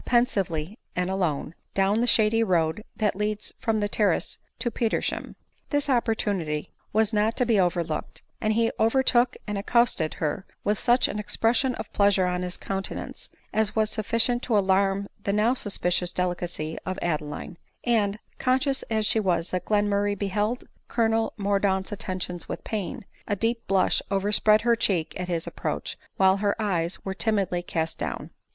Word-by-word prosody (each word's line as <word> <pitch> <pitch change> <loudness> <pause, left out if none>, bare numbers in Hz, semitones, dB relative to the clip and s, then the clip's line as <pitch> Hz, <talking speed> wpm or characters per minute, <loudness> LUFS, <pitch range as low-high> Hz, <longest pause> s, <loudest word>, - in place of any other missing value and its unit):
pensively 200 -6 0 0.2
and 180 +1 0
alone, 170 -5 -1 0.2
down 195 +3 +3
the 245 - +1
shady 225 -1 +5
road 175 -2 +1
that 210 -3 0
leads 210 +1 -2
from 220 -1 0
the 205 - +1
terrace 205 0 0 0.2
to 240 - -2
Petersham. 225 -1 -1 0.3
This 290 -1 +1
opportunity 200 - 0 0.2
was 220 +1 +2
not 215 +2 +1
to 250 - +2
be 225 -4 +3
overlooked; 175 -3 -1 0.2
and 215 0 +2
he 230 +1 +2
overtook 245 +1 +3
and 210 -2 -2
accosted 220 -7 +2
her 155 +4 -2 0.2
with 210 0 +1
such 245 +1 +4
an 210 - -4
expression 235 +4 +1
of - - -7
pleasure 200 -2 +4
on 180 0 -1
bis 180 0 -3
countenance, 195 0 -5 0.2
as 215 -1 +2
was 215 -1 +2
sufficient 230 +3 +1
to 230 -5 +1
alarm 195 0 +2 0.2
the 200 - 0
now 210 +4 +3
suspicious 180 -6 0
delicacy 175 -3 -2
of 185 0 -3
Adeline; 155 +1 -3 0.2
and, 215 -4 +2 0.2
conscious 265 +2 +2
as 220 -1 +1
she 220 - +3
was 175 -4 0
that 185 - -2
Glenmurray 205 -1 +1
beheld 210 +5 -1 0.2
Colonel 225 -1 +1
Mordaunt's 200 -1 +1
attentions 185 -3 -3
with - - -5
pain, 205 -2 -4 0.2
a 205 - +1
deep 230 +3 -1
blush 195 -1 +3
overspread 205 +2 +4
her 235 0 +3
cheek 185 -8 0
at 180 - -3
his 170 -2 -1
approach, - - -4 0.2
while 190 0 +5
her 205 +1 0
eyes 180 -5 -1
were 190 - -2
timidly 195 -4 0
cast 165 -2 -3
down. - - -4
205 Hz, 160 wpm, -26 LUFS, 185-225 Hz, 0.3 s, shady